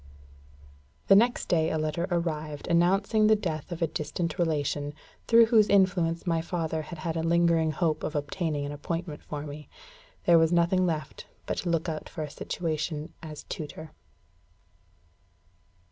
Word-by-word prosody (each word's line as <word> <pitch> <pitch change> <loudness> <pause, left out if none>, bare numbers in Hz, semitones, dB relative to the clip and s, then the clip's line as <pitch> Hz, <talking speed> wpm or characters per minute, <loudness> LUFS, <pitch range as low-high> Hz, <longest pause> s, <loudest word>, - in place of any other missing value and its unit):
The 195 - +9
next 240 +4 +3
day 160 -2 +2
a 160 - -1
letter 155 +3 -1
arrived 155 -4 -2
announcing 195 +5 +3
the 220 - +6
death 170 -5 -4
of 170 0 -2
a - - +2
distant 160 +2 -3
relation, 145 -3 -1 0.3
through 230 0 +7
whose 225 -3 +4
influence 180 -4 +2
my 165 -2 +1
father 160 -2 -2
had 165 +2 -8
had 160 +1 -3
a 165 - 0
lingering 165 -1 +3
hope 155 -1 0
of 155 - -3
obtaining 145 0 -2
an 145 - -4
appointment 160 +2 -4
for 145 -1 -6
me. 150 0 -9 0.6
There 170 -1 +6
was 160 0 +3
nothing 175 +2 +3
left 155 -2 -4 0.2
but - - -3
to 175 - -2
look 165 -1 0
out 155 -2 -4
for 155 - -5
a 150 - -6
situation 155 -1 -3
as 155 -2 -8
tutor. 155 0 -7
165 Hz, 160 wpm, -28 LUFS, 155-175 Hz, 0.6 s, The